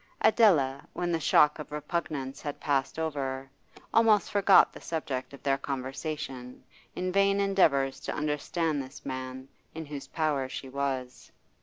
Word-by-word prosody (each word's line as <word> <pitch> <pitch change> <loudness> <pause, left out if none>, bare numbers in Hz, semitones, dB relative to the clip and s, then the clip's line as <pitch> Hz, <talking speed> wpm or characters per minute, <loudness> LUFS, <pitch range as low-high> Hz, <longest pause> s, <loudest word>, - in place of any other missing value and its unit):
Adela, 140 - +4
when 175 -1 -2
the 165 - +1
shock 150 0 +4
of 150 - -8
repugnance 150 -3 -3
had 145 -1 -5
passed 140 -1 0
over, 135 -4 -3 0.5
almost 220 -2 +4
forgot 200 -1 +5
the - - -11
subject 140 -6 -4
of 140 - -13
their 135 -1 +1
conversation 135 -1 -5 0.3
in 185 0 -2
vain 200 +1 +3
endeavours 140 -9 +2
to - - -4
understand 150 +1 -1
this 130 0 -11
man 130 0 -5 0.3
in 160 0 -5
whose 145 -1 -7
power 150 -5 -1
she 135 - -6
was. 130 -2 -4
145 Hz, 145 wpm, -29 LUFS, 135-165 Hz, 0.5 s, forgot